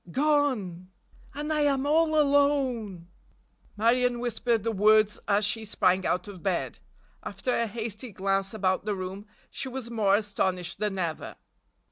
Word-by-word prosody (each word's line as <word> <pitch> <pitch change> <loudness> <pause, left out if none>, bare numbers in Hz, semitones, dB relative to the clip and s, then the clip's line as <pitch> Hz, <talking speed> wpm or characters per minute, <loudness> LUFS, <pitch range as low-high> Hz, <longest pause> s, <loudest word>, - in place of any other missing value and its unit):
"Gone! 255 - 0 0.5
And 300 +2 -2
I 300 - +1
am 280 -2 +1
all 310 +1 +3
alone!" 270 - +1 0.7
Marion 240 +3 +2
whispered 235 -2 -1
the 230 - 0
words 215 0 +4
as 205 0 +3
she 220 +2 -1
sprang 190 -3 +1
out 180 - -1
of 195 -4 -10
bed. 185 -1 -2 0.4
After 205 +6 -3
a 235 - 0
hasty 225 +2 -5
glance 195 0 -1
about 190 -3 -1
the 210 -1 -1
room 190 +2 -6 0.2
she 265 - -4
was 250 -2 -6
more 205 -4 +3
astonished 190 -3 -2
than 210 -2 -2
ever. 170 -4 -4
215 Hz, 145 wpm, -27 LUFS, 195-255 Hz, 0.7 s, words